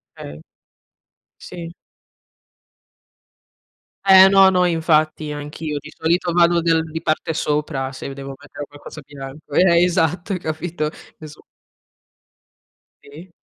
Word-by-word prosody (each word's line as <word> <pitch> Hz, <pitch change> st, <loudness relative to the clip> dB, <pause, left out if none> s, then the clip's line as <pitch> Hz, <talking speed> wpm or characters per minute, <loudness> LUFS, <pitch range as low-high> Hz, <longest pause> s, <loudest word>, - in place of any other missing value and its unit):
Okay. 75 Hz, +1 st, -10 dB, 1.0 s
Sì. 170 Hz, -2 st, -9 dB, 2.3 s
Eh 190 Hz, -1 st, +8 dB
no, 195 Hz, -1 st, +6 dB
no 180 Hz, -1 st, +2 dB
infatti 155 Hz, -2 st, +1 dB
anch'io 150 Hz, +1 st, -5 dB
di -, -, -13 dB
solito 170 Hz, +2 st, 0 dB
vado 170 Hz, 0 st, +4 dB
del 165 Hz, -1 st, +1 dB
di 160 Hz, +1 st, -6 dB
parte 155 Hz, +1 st, -1 dB
sopra, 150 Hz, -3 st, -2 dB
se 130 Hz, -, -8 dB
mi 135 Hz, -, -7 dB
devo 140 Hz, 0 st, -8 dB
mettere 145 Hz, +1 st, -10 dB
qualcosa 145 Hz, +1 st, -12 dB
bianco. 140 Hz, +1 st, -11 dB
Eh, 170 Hz, +1 st, +4 dB
esatto 175 Hz, +2 st, 0 dB
hai 180 Hz, -, -3 dB
capito? 160 Hz, -1 st, -3 dB, 0.3 s
E 155 Hz, -, -9 dB
su 150 Hz, 0 st, -14 dB, 1.6 s
Sì. 160 Hz, +6 st, -14 dB
160 Hz, 120 wpm, -20 LUFS, 145-175 Hz, 2.3 s, Eh